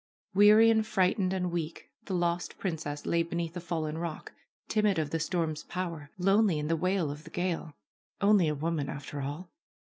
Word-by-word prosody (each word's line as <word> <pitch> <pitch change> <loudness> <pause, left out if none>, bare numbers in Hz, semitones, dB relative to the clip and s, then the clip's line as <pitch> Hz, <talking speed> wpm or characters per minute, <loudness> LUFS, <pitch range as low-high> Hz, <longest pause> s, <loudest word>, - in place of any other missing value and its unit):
Weary, 210 +3 +7
and 220 -1 +3
frightened, 190 -2 +1
and 180 -2 -1
weak, 165 -2 -4
the 190 - -2
lost 175 0 -1
princess 155 -5 -4
lay 170 - +2
beneath 170 0 -3
a - - -3
fallen 160 -2 -3
rock, 170 -2 -5 0.4
timid 210 -3 +2
of 155 -2 -1
the 165 - 0
storm's 160 -2 -1
power, 170 -5 -4
lonely 195 -1 +3
in 150 0 -2
the 165 - +3
wail 180 -2 0
of 150 +1 -8
the - - -11
gale. 175 -4 -3 0.4
Only 200 -4 +4
a 150 - 0
woman, 155 -1 -2
after 145 0 -6
all 145 +6 -5
170 Hz, 180 wpm, -30 LUFS, 155-185 Hz, 0.4 s, Weary